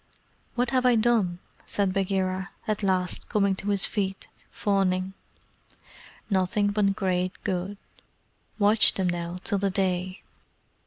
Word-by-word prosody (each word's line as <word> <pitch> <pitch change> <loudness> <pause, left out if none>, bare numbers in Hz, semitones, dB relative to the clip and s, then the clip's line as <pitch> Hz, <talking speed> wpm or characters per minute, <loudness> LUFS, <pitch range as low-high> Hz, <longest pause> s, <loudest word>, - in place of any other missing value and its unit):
"What 245 0 0
have 255 -1 +2
I 250 -1 +5
done?" 220 -6 +2 0.3
said 200 -2 0
Bagheera, 190 0 -1 0.2
at 215 -1 -1
last 185 -2 -1
coming 200 -3 +2
to 200 - -3
his 200 -1 +2
feet, 195 -3 -3 0.2
fawning. 190 -2 0 1.1
"Nothing 200 +1 +1
but 200 -1 +1
great 185 -2 0
good. 190 +2 -2 0.8
Watch 210 0 +5
them 190 -2 0
now 175 0 -3
till 200 -2 +2
the 200 0 +1
day. 185 -1 -1
195 Hz, 125 wpm, -26 LUFS, 185-205 Hz, 1.1 s, I